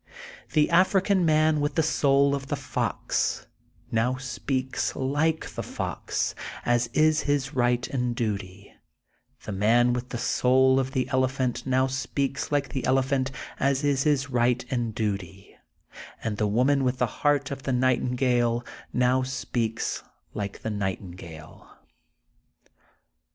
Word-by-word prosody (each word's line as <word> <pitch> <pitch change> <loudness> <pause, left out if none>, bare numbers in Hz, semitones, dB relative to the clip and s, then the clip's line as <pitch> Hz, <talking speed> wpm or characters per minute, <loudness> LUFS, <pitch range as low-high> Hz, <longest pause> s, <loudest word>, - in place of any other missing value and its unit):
The 150 0 +3
African 185 +1 +3
man 155 0 +3
with 145 0 -1
the 160 - +3
soul 140 -2 +3
of 140 -1 -3
the - - -1
fox, - - -2 0.5
now 120 +3 +1
speaks 130 0 -2
like 145 +4 0
the - - -4
fox, - - -3 0.3
as 120 0 +2
is 155 0 +4
his 140 -2 +1
Tight 120 -1 +1
and 125 -3 -1
duty, 100 -4 -4 0.7
the - - -5
man 115 +5 +3
with 125 +1 -4
the 120 - -4
soul 130 +2 +3
of 130 0 -2
the 130 -2 0
ele 130 0 +2
phant 130 -1 -2
now 130 0 +3
speaks 135 +1 -2
like 145 -1 +1
the 130 - -3
elephant, 130 +1 +1 0.3
as 135 +1 +1
is 140 -2 +2
his 140 -2 +1
right 125 0 +2
and 120 -4 -1
duty, 100 -3 -4 0.7
and 110 -2 -2
the 105 - +1
woman 130 +6 +2
with 125 0 0
the 125 - +2 0.2
heart 145 -1 +2
of 135 -1 -5
the 135 - -2
nightingale 125 -1 +1 0.3
now 125 +1 +2
speaks 125 -3 -2 0.3
like 100 -1 -5
the 110 - -2
night 100 -3 -2
ingale. 85 -4 -11
130 Hz, 140 wpm, -26 LUFS, 120-140 Hz, 0.7 s, is